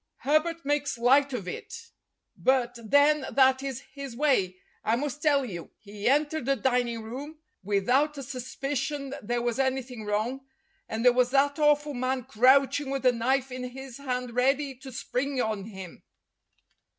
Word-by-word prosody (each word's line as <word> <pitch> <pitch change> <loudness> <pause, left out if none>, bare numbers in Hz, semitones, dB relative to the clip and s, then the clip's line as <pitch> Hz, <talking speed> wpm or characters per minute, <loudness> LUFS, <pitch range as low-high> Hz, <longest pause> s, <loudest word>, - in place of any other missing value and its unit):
Herbert 320 +3 +1
makes 290 -2 0
light 270 +4 +4
of 220 -8 -4
it, 460 - -8 0.4
but 250 -2 +1
then 285 +5 +4
that 265 -1 +4
is 270 -2 -4
his 275 -4 -7
way. 235 -10 +1 0.3
I 225 - +2
must 290 +3 -3
tell 285 -3 +3
you, 175 -8 -7
he 205 0 -6
entered 295 -1 +1
the 275 - +3
dining 245 -3 0
room 275 +8 -7 0.2
without 245 +10 +1
a 275 - -5
suspicion 275 +2 -4
there 240 +2 -2
was 240 +1 -1
anything 260 -3 -1
wrong, 215 +6 -1 0.5
and 225 +2 -3
there 250 - +7
was 250 0 +3
that 280 +3 +2
awful 295 0 +3
man 255 0 -1
crouching 265 +5 +3
with 270 -1 -3
a 250 - +7
knife 260 +3 0
in 255 0 -5
his 260 0 -8
hand 250 -3 -3
ready 270 +3 +1
to 265 +1 -11
spring 265 +2 -2
on 215 -4 -1
him. 190 -5 -10
265 Hz, 160 wpm, -27 LUFS, 240-280 Hz, 0.5 s, there